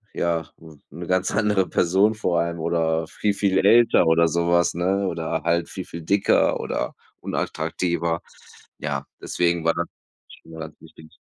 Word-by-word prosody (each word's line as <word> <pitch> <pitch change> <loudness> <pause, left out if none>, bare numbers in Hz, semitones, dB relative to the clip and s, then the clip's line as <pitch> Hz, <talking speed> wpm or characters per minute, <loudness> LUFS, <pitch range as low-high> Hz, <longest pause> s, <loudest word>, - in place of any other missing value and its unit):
ja, 85 -1 -1
'n 80 -3 -15
'ne 85 +4 -8
ganz 90 +2 +1
andere 105 -3 +1
Person 95 +5 +2
vor 90 -6 0
einem 85 0 -3
oder 80 0 0
viel, 100 +5 -2
viel 95 -2 +2
älter 115 -3 +5
oder 80 +1 +4
sowas, 85 +1 +2
ne, 95 +3 0
oder 85 -3 -2
halt 85 0 0
viel, - - -6
viel 85 - -8
dicker 100 +5 +2
oder - - -3 0.2
unattraktiver. 85 -1 -2 0.6
Ja, 75 -2 -3 0.2
deswegen 85 -1 0
war 85 - +3
dann 85 0 -2 0.4
schwier 80 0 -13
äh, - - -7
wichtig. 80 -1 -16
85 Hz, 155 wpm, -23 LUFS, 80-95 Hz, 0.6 s, älter